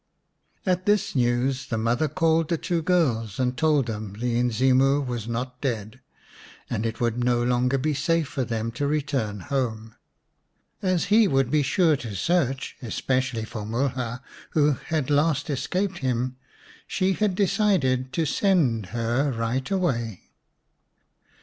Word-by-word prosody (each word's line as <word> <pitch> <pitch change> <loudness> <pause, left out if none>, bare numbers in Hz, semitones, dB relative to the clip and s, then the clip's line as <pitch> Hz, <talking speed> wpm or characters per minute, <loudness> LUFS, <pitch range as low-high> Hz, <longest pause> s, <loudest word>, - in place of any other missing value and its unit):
At 185 0 0
this 205 -4 +2
news 130 +2 +1
the 115 - -2
mother 120 +7 +1
called 160 +2 +1
the 170 - +1
two 170 0 -1
girls 130 - +1
and 125 0 +1
told 150 -2 +2
them 105 -3 -5
the 120 +3 -2
Inzimu 130 +3 +3
was 120 -3 -4
not 125 +2 -4
dead, 110 -6 -3 0.7
and 110 +2 -1
it 115 - -5
would 120 0 0
no 120 -1 +2
longer 125 +2 +2
be 150 +3 0
safe 165 +2 +1
for 130 0 -2
them 115 -1 -2
to 140 +5 -2
return 135 -9 -1
home. 115 -5 -3 0.9
As 185 -3 +1
he 220 -1 +6
would 135 -4 +1
be 150 - +3
sure 160 +2 +3
to 115 -5 -7
search, 135 - 0
especially 125 -1 -1
for 110 -1 -6
Mulha, 125 +2 -2 0.3
who 150 0 +5 0.2
had 155 -4 -1
last 145 0 +2
escaped 185 +7 -1
him, 130 -1 -1 0.5
she 190 0 +1
had 205 0 0
decided 175 - +1
to 165 -3 +1
send 140 - +2
her 120 +5 0
right 120 +3 -2
away. 120 - -1
130 Hz, 145 wpm, -25 LUFS, 120-155 Hz, 0.9 s, he